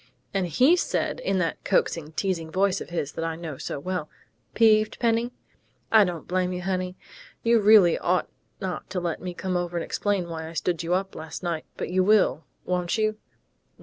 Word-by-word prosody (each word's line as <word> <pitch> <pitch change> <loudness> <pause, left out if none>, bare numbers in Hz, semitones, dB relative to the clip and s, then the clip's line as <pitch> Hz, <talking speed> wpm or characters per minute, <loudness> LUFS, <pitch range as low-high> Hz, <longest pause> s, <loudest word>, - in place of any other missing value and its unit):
And 190 -2 0
he 255 - +5
said, 360 - -1
in 195 0 0
that 175 -3 -1
coaxing, 160 -2 0
teasing 170 -3 -2
voice 195 +2 +1
of - - -7
his 160 -5 -2
that 165 - -4
I 165 -1 -2
know 160 -4 -6
so - - -4
well: 180 0 -3 0.5
'Peeved, 215 -1 +4
Penny?... 235 0 +1 0.6
I 220 -1 +8
don't 175 -3 -5
blame 180 0 0
you, 180 0 -4
honey. 185 -1 -2 0.5
You 235 0 +4
really 205 -5 +6
ought 180 +1 +1 0.3
not 190 -2 -4
to 185 -1 -2
let 175 -2 -3
me 180 -1 -5
come 185 0 -2
over 175 -1 -1
and 170 - -1
explain 200 -4 -1
why 160 -1 -5
I - - -10
stood 170 +1 -1
you 170 +2 +1
up 195 +1 -2
last 160 +3 -7
night, 170 -3 -2
but - - -3
you 185 0 +3
will, 200 -5 +3 0.2
won't 180 +2 0
you?... 215 0 0
180 Hz, 195 wpm, -26 LUFS, 170-200 Hz, 0.6 s, I